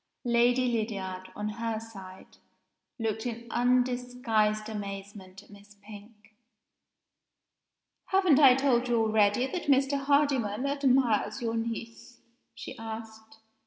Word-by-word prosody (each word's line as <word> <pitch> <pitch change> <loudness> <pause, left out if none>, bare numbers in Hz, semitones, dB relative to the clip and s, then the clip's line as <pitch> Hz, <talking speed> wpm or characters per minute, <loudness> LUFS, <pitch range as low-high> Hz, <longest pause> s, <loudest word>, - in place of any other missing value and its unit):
Lady 240 +1 +3
Lydiard, 195 -5 -3
on 210 0 -4
her 225 -1 -2
side, 195 -4 -12 0.6
looked 225 0 -2
in 235 0 -6
undisguised 245 -3 +1
amazement 200 -2 -8
at - - -21
Miss 205 0 -16
Pink. 210 +1 -14 1.7
"Haven't 375 -7 +3
I 265 -4 +8
told 255 -2 +1
you 240 -1 +1
already 220 +1 +2
that 345 +6 -5
Mr. 275 0 +3
Hardyman 275 -5 +1
admires 265 -5 +1
your 230 -1 -1
niece?" 230 +1 -6 0.4
she - - -8
asked. 220 0 -9
225 Hz, 110 wpm, -28 LUFS, 210-250 Hz, 1.7 s, I